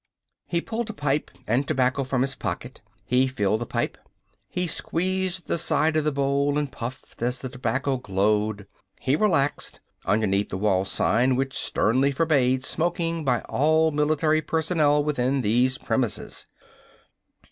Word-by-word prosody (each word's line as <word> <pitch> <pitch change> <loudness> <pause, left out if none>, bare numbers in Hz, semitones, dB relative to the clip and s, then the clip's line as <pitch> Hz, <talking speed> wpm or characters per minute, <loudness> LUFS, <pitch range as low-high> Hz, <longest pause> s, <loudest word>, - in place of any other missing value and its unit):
He 170 -1 0
pulled 230 +2 -4
a - - -4
pipe 145 -1 -1 0.2
and 125 +6 +1
tobacco 135 -1 +1
from 130 -1 -1
his 135 0 -1
pocket. - - -5 0.2
He 130 +2 +3
filled 110 -4 0
the 120 - -3
pipe. - - -2 0.5
He 180 - -1
squeezed 185 +2 -1
the - - -1
side 155 +1 +2
of 155 - +2
the 150 - +2
bowl 140 +1 +1
and 145 -2 -1
puffed 120 +1 -8
as 125 +1 0
the 130 +1 -6
tobacco 130 +2 -1
glowed. 105 -1 0 0.3
He 135 +2 +1
relaxed, 160 -7 0 0.2
underneath 100 0 +1
the 95 - -3
wall 95 -1 +1
sign 125 +6 +2
which 135 +1 -2
sternly 130 +6 +2
forbade 130 -4 +2
smoking 165 0 -1
by 125 -4 +1
all 155 +2 +2
military 155 +1 +2
personnel 155 -2 +2
within 135 -2 0
these 125 +4 +2
premises. 125 -6 -3
135 Hz, 145 wpm, -25 LUFS, 125-155 Hz, 0.5 s, He